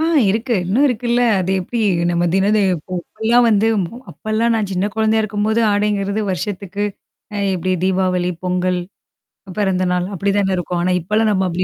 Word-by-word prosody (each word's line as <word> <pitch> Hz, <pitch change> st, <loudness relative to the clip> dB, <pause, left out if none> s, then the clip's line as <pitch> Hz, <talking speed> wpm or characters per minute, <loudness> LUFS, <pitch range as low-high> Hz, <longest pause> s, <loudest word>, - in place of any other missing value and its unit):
ஆ 320 Hz, -, +2 dB, 0.3 s
இருக்கு. 230 Hz, +3 st, 0 dB
இன்னும் 220 Hz, +11 st, +2 dB
இருக்குல்ல. 240 Hz, 0 st, 0 dB, 0.2 s
அது 185 Hz, 0 st, -1 dB
எப்டி 235 Hz, +6 st, -4 dB, 0.3 s
நம்ம 175 Hz, 0 st, +1 dB
தினது 205 Hz, +3 st, +3 dB, 0.4 s
இப்பல்லாம் 235 Hz, +6 st, +1 dB
வந்து 215 Hz, 0 st, +3 dB, 0.4 s
அப்பல்லாம் 225 Hz, +1 st, 0 dB
நான் 215 Hz, -3 st, -1 dB
சின்ன 185 Hz, +2 st, 0 dB
குழந்தையா 220 Hz, 0 st, +2 dB
இருக்கும்போது 215 Hz, +2 st, 0 dB
ஆடைங்கிறது 205 Hz, 0 st, 0 dB
வருஷத்துக்கு. 200 Hz, +1 st, -3 dB, 0.5 s
அ -, -, -2 dB, 0.2 s
எப்டி 185 Hz, +1 st, -1 dB
தீபாவளி, 185 Hz, -1 st, +1 dB
பொங்கல், 180 Hz, 0 st, 0 dB, 0.8 s
பிறந்த 190 Hz, -2 st, +1 dB
நாள் 180 Hz, 0 st, 0 dB
அப்டி 200 Hz, +2 st, 0 dB
தான 195 Hz, -1 st, +1 dB
இருக்கும். 180 Hz, 0 st, -2 dB
ஆனா 180 Hz, +1 st, +1 dB
இப்பலாம் 215 Hz, +5 st, +1 dB
நம்ம 190 Hz, -2 st, +1 dB
அப்டி 175 Hz, +1 st, -1 dB
200 Hz, 155 wpm, -18 LUFS, 185-220 Hz, 0.8 s, தினது